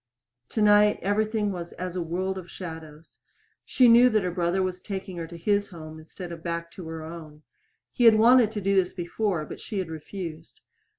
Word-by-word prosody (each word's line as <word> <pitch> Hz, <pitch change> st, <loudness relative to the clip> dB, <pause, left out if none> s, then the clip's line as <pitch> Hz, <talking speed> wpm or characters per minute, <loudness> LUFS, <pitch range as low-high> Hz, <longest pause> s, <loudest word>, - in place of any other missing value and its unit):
Tonight 210 Hz, -1 st, +4 dB
everything 210 Hz, +1 st, 0 dB
was 175 Hz, -2 st, -6 dB
as 180 Hz, 0 st, -6 dB
a 180 Hz, -, -1 dB
world 185 Hz, +3 st, -2 dB
of 175 Hz, -2 st, -12 dB
shadows. 160 Hz, -3 st, -10 dB, 0.4 s
She 255 Hz, -, +4 dB
knew 240 Hz, +2 st, +7 dB
that 215 Hz, -4 st, +1 dB
her 180 Hz, -, -1 dB
brother 175 Hz, +1 st, 0 dB
was 185 Hz, -1 st, -3 dB
taking 190 Hz, -2 st, -6 dB
her 165 Hz, -1 st, -5 dB
to 170 Hz, +1 st, -10 dB
his 200 Hz, +4 st, +1 dB
home 160 Hz, -3 st, -10 dB
instead 170 Hz, +3 st, -9 dB
of 165 Hz, -1 st, -8 dB
back 170 Hz, 0 st, -4 dB
to 180 Hz, -4 st, -9 dB
her 160 Hz, -1 st, -6 dB
own. 155 Hz, -2 st, -10 dB, 0.5 s
He 245 Hz, -, +2 dB
had 225 Hz, -1 st, +8 dB
wanted 230 Hz, 0 st, +5 dB
to 210 Hz, -, -3 dB
do 195 Hz, +1 st, +1 dB
this 185 Hz, -2 st, +2 dB
before, 175 Hz, -1 st, -2 dB
but -, -, -9 dB
she 215 Hz, -, -6 dB
had 185 Hz, -4 st, -2 dB
refused. 160 Hz, 0 st, -8 dB
185 Hz, 195 wpm, -26 LUFS, 165-205 Hz, 0.5 s, had